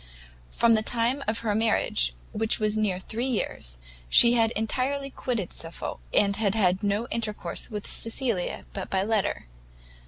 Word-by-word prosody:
From 235 -1 +3
the 220 - +3
time 240 +5 0
of 220 +1 0
her 215 -2 0
marriage, 205 - +1 0.2
which 225 +1 +1
was 215 -1 +1
near 210 -4 +1
three 225 +6 -3
years, - - -2 0.3
she 235 - +8
had 225 -2 +3
entirely 270 +5 -1
quitted 235 -10 -3
Suffolk, 165 +1 -5
and 200 -1 +3
had 210 -2 +1
had 185 -3 +2
no 205 +3 0
intercourse 210 -6 -2
with 210 -3 -5
Cecilia 225 -5 -2
but 195 -2 -5
by 190 0 +1
letter. 210 - 0
220 Hz, 155 wpm, -26 LUFS, 200-230 Hz, 0.3 s, she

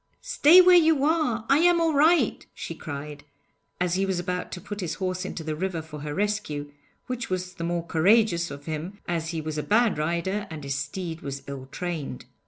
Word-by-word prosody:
'Stay 370 -8 +6
where 365 0 +7
you 320 -5 +5
are! 295 -8 +1
I 275 +2 +4
am 350 0 +5
all 330 -1 +2
right,' 300 -3 +3
she - - -6
cried, 145 -2 -7 0.6
as 180 -1 0
he 190 +2 +1
was 190 -2 0
about 180 0 -3
to - - -5
put 205 +2 -7
his 170 -3 -3
horse 185 0 -3
into 170 - -5
the 155 -1 -3
river 180 +1 -2
for 150 -1 -9
her 145 0 -5
rescue, 200 -9 -2 0.3
which 250 -2 -4
was 185 0 -3
the 170 - -7
more 170 0 -2
courageous 170 0 +3
of 140 +1 -9
him, 165 +5 -5
as 165 -2 -2
he 165 -2 -3
was 155 0 -4
a - - 0
bad 220 -1 +2
rider 170 +6 -1
and 155 -3 -7
his 140 0 -2
steed 165 +4 -4
was 140 -1 -6
ill 135 -2 -7
trained. 155 -3 -5
180 Hz, 205 wpm, -26 LUFS, 155-220 Hz, 0.6 s, where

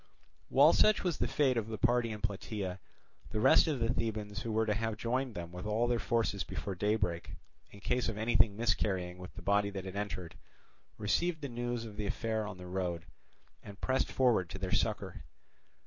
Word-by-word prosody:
While - - +7
such 215 0 +4
was 175 -5 -1
the - - +1
fate 135 -4 +2
of 110 -2 -1
the 110 -1 -4
party 120 +1 +2
in 105 -1 -6
Plataea, 100 -2 -3 0.5
the 110 - -2
rest 110 - +6
of 150 -5 0
the 115 +1 +1
Thebans 105 -3 -3
who 115 - -3
were 110 +1 +2
to 105 - +1
have 110 0 -2
joined 125 +1 -1
them 85 -1 -6
with 90 +3 -6
all 110 +3 +2
their 120 -1 +1
forces 115 -5 0
before 100 - -4
daybreak, 95 -3 -1 0.3
in 100 - -14
case 125 +3 0
of 110 - -4
anything 110 -2 +3
miscarrying 95 -5 0
with 90 +1 -10
the - - -9
body 100 0 +2
that 95 -1 -6
had 95 0 -6
entered, 90 -5 -4 0.6
received 160 - 0
the 140 - -4
news 120 -1 -3
of 105 -2 -9
the 105 - -2
affair 110 0 -1
on 105 -2 -7
the 90 - -9
road, 90 -2 -3 0.6
and 100 0 -11
pressed 130 -1 0
forward 115 -9 +3
to - - -6
their 95 -1 -3
succour. - - -1
105 Hz, 200 wpm, -33 LUFS, 95-120 Hz, 0.6 s, While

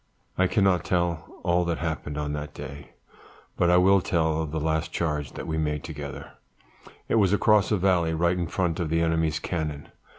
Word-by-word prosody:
"I 95 - +3
cannot 95 -4 +2
tell 85 -2 -2
all 90 0 +2
that 85 -1 -1
happened 80 -3 -4
on 75 -1 -2
that 75 0 -6
day, 70 +1 -9 0.6
but 85 - +2
I 90 - +5
will 95 +1 +5
tell 80 -2 +1
of 80 - -3
the 80 +1 -2
last 80 +2 -1
charge 75 -5 -2
that - - -6
we 80 0 -2
made 75 -1 -1
together; 70 -3 -7 0.8
it 115 - +2
was 95 0 +3
across 105 0 +4
a 105 - +3
valley 90 -3 +2
right 85 +2 +2
in 90 -2 -2
front 90 -1 -1
of 85 -3 -1
the 80 +1 +1
enemy's 80 -1 +1
cannon. 75 -4 -4
80 Hz, 195 wpm, -26 LUFS, 75-90 Hz, 0.8 s, I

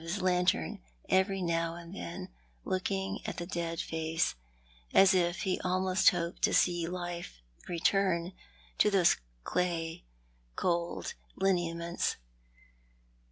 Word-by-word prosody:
s 170 +5 -3
lantern 180 - +1 0.3
every 190 0 +2
now 165 -1 0
and 170 +1 -10
then, 185 -1 -6 0.4
looking 190 +1 -1
at - - -4
the 175 - -3
dead 170 -2 -3
face 160 0 0 0.6
as 195 0 +8
if 175 -1 +1
he 185 -1 0
almost 185 +1 +4
hoped 170 0 -3
to - - +3
see 175 -2 +3
life 175 - -5 0.3
return 175 0 +1 0.5
to 210 - +6
those 190 -4 +4 0.3
clay 170 - -1 0.5
cold 170 -1 -1 0.2
lineaments. 170 -3 0
175 Hz, 115 wpm, -31 LUFS, 170-185 Hz, 0.6 s, as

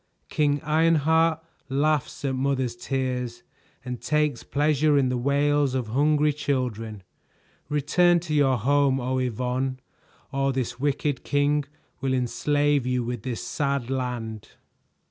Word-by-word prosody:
"King 145 -1 +1
Ironheart 160 +1 +3 0.3
laughs 145 +1 0
at 135 - 0
mothers' 130 -2 -1
tears 125 -2 -3 0.4
and 125 -1 -5
takes 150 +1 0
pleasure 150 0 +2
in 135 -2 +3
the 125 - 0
wails 140 +1 +2
of 125 -4 -2
hungry 150 +4 +2
children; 115 -8 -3 0.7
return 170 +4 +3
to 160 -2 -4
your 135 -3 +3
home, 135 +3 +2
Oh 130 +1 -1
Yvonne, 130 +2 -2 0.5
or 135 -1 0
this 130 -2 -3
wicked 145 0 -1
king 145 0 +1 0.3
will 130 0 0
enslave 145 +3 +1
you 125 -1 0
with 120 -1 -4
this 120 -2 -4
sad 140 -3 -1
land." 120 -5 -3
135 Hz, 125 wpm, -25 LUFS, 125-145 Hz, 0.7 s, Ironheart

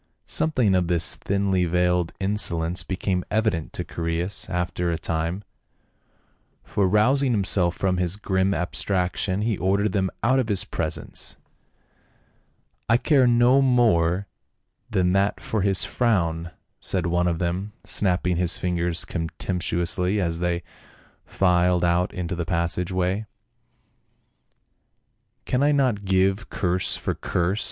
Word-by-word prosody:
Something 130 -10 +1
of 90 -2 +2
this 85 -2 +3
thinly 100 -2 0
veiled 90 0 +1
insolence 90 -4 +1
became 95 -1 -2
evident 105 -7 0
to - - -3
Chaereas 85 +3 -3
after 90 -1 -2
a 85 - -1
time, 85 +4 -3 1.2
for 100 -2 0
rousing 125 +7 +3
himself 95 -4 +2
from 95 -1 0
his 90 0 +1
grim 95 -2 0
abstraction 95 +1 -1
he 110 -3 -1
ordered 100 +2 +1
them 95 -2 0
out 130 +3 +3
of 125 - 0
his 100 -3 +2
presence. - - -4 0.8
" - - -41
I 115 - +5
care 135 -1 +3
no 120 +3 +4
more 100 -8 +3 0.6
than 90 -1 +1
that 100 +1 +1
for 110 - -2
his 95 -1 +1
frown," 85 -8 0 0.3
said 90 -3 -1
one 85 +1 +1
of 85 -2 0
them, 90 +4 -3
snapping 90 -2 0
his 90 -1 +2
fingers 85 -1 -1
contemptuously 90 +2 -1
as 85 -3 -1
they 90 0 -1 0.6
filed 90 -1 +2
out 85 +1 +1
into 90 -1 -4
the 85 -1 -2
passage 85 +2 -1
way. 95 +4 -1 0.7
" - - -46
Can 125 - 0
I 145 +1 +4
not 130 -8 +1
give 95 +3 +1
curse 90 -2 -1
for - - -2
curse? 90 +4 -1
90 Hz, 130 wpm, -24 LUFS, 85-105 Hz, 1.2 s, I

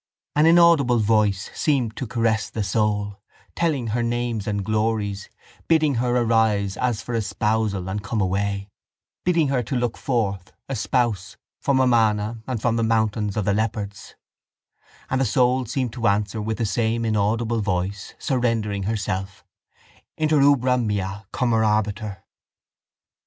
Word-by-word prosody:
An 150 +2 +5
inaudible 165 -7 +5
voice 105 -2 +1
seemed 130 -8 0
to 130 - -4
caress 110 -2 0
the 110 - -3
soul, 105 0 -1 0.4
telling 145 -9 0
her 120 - +1
names 120 -2 -2
and 100 -2 -2
glories, 105 -2 -1 0.4
bidding 155 -3 +3
her 125 0 +1
arise 110 -4 +2
as 120 -2 -1
for 120 - -5
espousal 110 -3 -1
and 100 +2 -3
come 110 +2 -2
away, 100 +1 -1 0.6
bidding 170 -5 +2
her 135 -2 +1
look 120 -3 -1
forth, 100 -8 -2
a 135 - -3
spouse, 110 -4 -1 0.2
from 135 -2 +1
Amana 110 -3 +2
and 125 -3 -2
from 115 +1 0
the 115 - +1
mountains 110 -2 0
of 105 - 0
the 100 - +2
leopards; 105 -2 -3 0.9
and 130 0 0
the - - +4
soul 125 -1 +2
seemed 125 -1 -2
to 120 -2 -1
answer 105 +1 0
with 110 0 -2
the 115 - -1
same 115 +2 0
inaudible 110 +2 0
voice, 100 0 -3
surrendering 115 -6 -1
herself: 95 -3 -3 0.7
_Inter 155 -2 +3
ubera 130 -3 +3
mea 100 -2 -3
commorabitur. 110 -4 0
110 Hz, 140 wpm, -23 LUFS, 105-125 Hz, 0.9 s, An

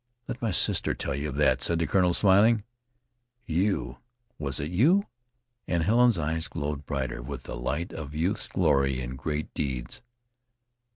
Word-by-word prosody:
"Let 120 - -5
my 115 - 0
sister 90 - +1
tell 70 - -3
you 70 +3 -3
of 70 - -6
that," 70 -3 +3
said 85 - +2
the 85 - +1
colonel, 90 +1 +2
smiling. 105 +3 +5 0.8
"You! 80 - -1 0.4
Was 70 -3 -2
it 75 +3 -3
you?" 165 - +4 0.6
And 85 -2 +1
Helen's 120 +2 +4
eyes 80 +2 -1
glowed 75 -5 -4
brighter 65 -4 -3
with 70 +2 -7
the - - -6
light 75 +7 -3
of 75 -2 -7
youth's 85 +6 -1
glory 70 -1 +2
in 65 0 -5
great 75 +2 -4
deeds. 65 -4 -3
75 Hz, 160 wpm, -27 LUFS, 70-95 Hz, 0.8 s, smiling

